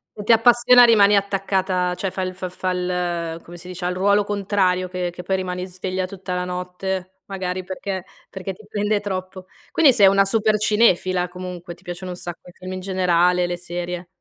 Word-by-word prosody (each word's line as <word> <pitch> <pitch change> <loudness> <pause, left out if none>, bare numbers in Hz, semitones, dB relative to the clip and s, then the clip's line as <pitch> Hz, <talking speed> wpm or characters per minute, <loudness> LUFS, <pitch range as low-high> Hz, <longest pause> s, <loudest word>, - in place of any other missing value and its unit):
E 210 - -7
ti 230 - +2
appassiona 240 +2 +6
rimani 210 -3 +6
attaccata 190 -2 0
cioè 195 - -2
fa 190 - -4
il 185 - -3
f 185 0 -5
fa 185 -1 -1
l 175 -2 -2
come 175 +1 -11
si 180 +1 -12
dice, 180 0 -6
ha - - +1
il 180 - -3
ruolo 200 +2 +3
contrario 195 -3 0
che 180 -1 -3
che 175 - -8
poi 190 +2 0
rimani 180 0 -3
sveglia 185 0 -3
tutta 185 -1 -6
la 180 0 -1
notte, 180 +1 -5
magari 185 -1 -4
perché 190 0 -5 0.3
perché 190 0 -6
ti 215 - -16
prende 210 0 0
troppo. 185 -2 -5 0.3
Quindi 290 -5 +5
sei 205 -5 +6
una 195 0 +5
super 215 +1 +2
cinefila 185 -4 +2
comunque, 180 -1 -8
ti - - -24
piacciono 175 +1 -6
un 180 - -7
sacco 175 0 -8
i - - -13
film 185 +1 -8
in 185 - -4
generale, 180 -1 +2
le 175 0 -3
serie. 175 0 -5
185 Hz, 205 wpm, -22 LUFS, 180-195 Hz, 0.3 s, appassiona